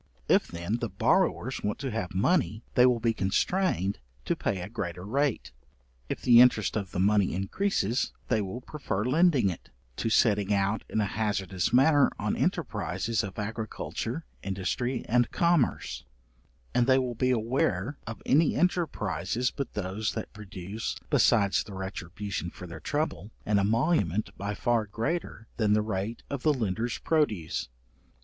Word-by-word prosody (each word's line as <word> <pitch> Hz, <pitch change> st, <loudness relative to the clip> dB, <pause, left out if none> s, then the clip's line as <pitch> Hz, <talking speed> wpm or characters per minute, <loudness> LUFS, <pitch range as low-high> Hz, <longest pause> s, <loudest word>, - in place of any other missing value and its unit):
If, -, -, +4 dB
then, 85 Hz, +6 st, -3 dB
the 120 Hz, -2 st, -3 dB
borrowers 95 Hz, -, +1 dB
want 105 Hz, -, -2 dB
to 135 Hz, -1 st, -4 dB
have 95 Hz, -5 st, -3 dB
money, 110 Hz, -, +1 dB
they 125 Hz, 0 st, +6 dB
will 125 Hz, -2 st, +2 dB
be 115 Hz, 0 st, +1 dB
constrained 100 Hz, -, 0 dB, 0.3 s
to -, -, +1 dB
pay 95 Hz, -, -1 dB
a 90 Hz, -, -5 dB
greater 90 Hz, -4 st, -5 dB
rate. 130 Hz, -, 0 dB, 0.6 s
If -, -, -4 dB
the 120 Hz, -1 st, +8 dB
interest 115 Hz, -6 st, +4 dB
of 100 Hz, -4 st, -2 dB
the 90 Hz, -, -4 dB
money 100 Hz, -1 st, +3 dB
increases, 115 Hz, -, 0 dB, 0.2 s
they 110 Hz, -3 st, +2 dB
will 100 Hz, +5 st, -5 dB
prefer 125 Hz, -7 st, -3 dB
lending 140 Hz, -, +3 dB
it, 85 Hz, -, -10 dB, 0.3 s
to 115 Hz, -, -1 dB
setting 105 Hz, -3 st, +3 dB
out 100 Hz, +1 st, +1 dB
in 110 Hz, -, 0 dB
a -, -, +1 dB
hazardous 100 Hz, -3 st, -1 dB
manner 140 Hz, +3 st, +5 dB
on -, -, -1 dB
enterprizes 115 Hz, -2 st, -1 dB
of 100 Hz, +2 st, -6 dB
agriculture, 110 Hz, +6 st, -4 dB, 0.2 s
industry, 100 Hz, +6 st, -2 dB
and 120 Hz, +1 st, +3 dB
commerce: 170 Hz, -7 st, +1 dB, 0.7 s
and 120 Hz, 0 st, +3 dB
they 130 Hz, -1 st, +5 dB
will 130 Hz, -2 st, 0 dB
be 125 Hz, +2 st, 0 dB
aware 115 Hz, 0 st, 0 dB
of 110 Hz, -3 st, -7 dB
any 155 Hz, +3 st, +4 dB
enterprizes 125 Hz, -, 0 dB
but 140 Hz, -, -4 dB
those 105 Hz, +2 st, -2 dB
that 110 Hz, -, -5 dB
produce, 105 Hz, 0 st, -5 dB, 0.2 s
besides 100 Hz, -4 st, +4 dB
the 105 Hz, -4 st, -10 dB
retribution 95 Hz, -1 st, -5 dB
for 90 Hz, -, -10 dB
their 85 Hz, -1 st, -8 dB
trouble, 150 Hz, -8 st, -2 dB, 0.2 s
an 105 Hz, -1 st, +3 dB
emolument 110 Hz, -, +1 dB
by 100 Hz, +2 st, -4 dB
far 115 Hz, -1 st, +1 dB
greater 115 Hz, -, -3 dB
than 105 Hz, -2 st, +3 dB
the 105 Hz, 0 st, +3 dB
rate 105 Hz, +2 st, -3 dB
of 140 Hz, -2 st, -4 dB
the 155 Hz, +1 st, +3 dB
lender's 115 Hz, 0 st, -1 dB
produce. 110 Hz, -, 0 dB
110 Hz, 155 wpm, -28 LUFS, 100-125 Hz, 0.7 s, the